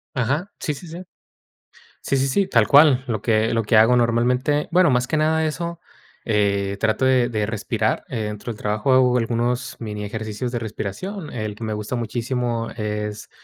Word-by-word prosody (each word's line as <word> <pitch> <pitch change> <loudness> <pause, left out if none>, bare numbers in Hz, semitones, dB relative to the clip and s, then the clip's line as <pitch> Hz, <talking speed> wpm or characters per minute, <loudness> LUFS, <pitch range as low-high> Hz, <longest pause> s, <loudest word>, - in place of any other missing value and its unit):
Ajá, 140 - -1
sí, 150 - -2
sí, 155 +6 -11
sí. 170 +2 -8 1.0
Sí, 140 - 0
sí, 135 - +1
sí, 195 +9 +1
tal 115 - +3
cual, 140 -3 +6
lo 110 -5 -3
que 110 -1 +2
lo 115 - +1
que 110 +1 +2
hago 115 +3 +6
normalmente, 125 +5 +1
bueno, 180 -1 +4
más 125 -1 +2
que 155 - 0
nada 160 +1 +2
eso, 170 +2 -4 0.5
eh, 100 -2 +1
trato 115 +4 +1
de 130 -2 +3
de 105 -3 -1
respirar, 110 -1 -1
eh, 110 -2 -3
dentro 105 +2 -5
del 105 - -12
trabajo 105 +5 0
hago 125 -1 +4
algunos 120 +2 -1
mini 105 -2 -5
ejercicios 110 +3 -4
de 120 - -1
respiración, 115 - -5
el 110 -3 -4
que 115 - -8
me 110 - -3
gusta 105 +3 -3
muchísimo 120 0 -2
es, 105 -1 -4
120 Hz, 185 wpm, -22 LUFS, 110-135 Hz, 1.0 s, cual